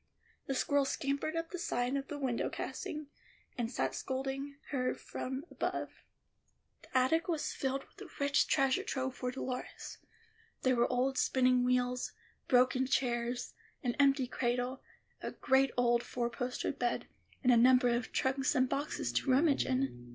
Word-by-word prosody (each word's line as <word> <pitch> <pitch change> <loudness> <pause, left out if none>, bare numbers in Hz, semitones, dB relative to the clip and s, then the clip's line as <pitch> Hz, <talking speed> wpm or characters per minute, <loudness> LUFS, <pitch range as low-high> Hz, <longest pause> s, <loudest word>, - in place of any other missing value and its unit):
The 270 - -1
squirrel 285 +1 +2
scampered 280 +3 -1
up 330 0 -3
the 360 - -4
side 245 -5 0
of 275 -1 -2
the 295 - -5
window 260 -4 -1
casing, 300 0 -5 0.5
and 235 -2 -2
sat 245 - -1
scolding 270 +1 -3 0.2
her 255 -3 0
from 265 +3 -5
above. - - -2 0.9
The - - -2
attic 320 +6 +3
was 325 -4 -1
filled 270 0 -2
with - - -19
a - - -8
rich 280 0 +3
treasure 270 -3 +3
trove 260 0 -2
for 250 0 -3
Dolores. 255 0 -5 0.6
There 255 -1 +4
were 240 +1 +2
old 255 +1 +1
spinning 255 -1 +3
wheels, 250 0 +1 0.3
broken 255 0 +4
chairs, 245 -2 0 0.3
an 245 -2 0
empty 275 -1 +4
cradle, 245 +1 -1 0.4
a - - -4
great 265 0 +3
old 240 -1 +3
four 240 -1 -2
posted 250 +1 -3
bed, 240 -1 0 0.4
and 255 - +5
a - - +7
number 250 +1 +6
of 235 -1 -1
trunks 270 +2 +1
and 255 -1 +4
boxes 285 +4 -2
to - - 0
rummage 280 +2 +4
in. 255 - -1
260 Hz, 160 wpm, -33 LUFS, 250-275 Hz, 0.9 s, a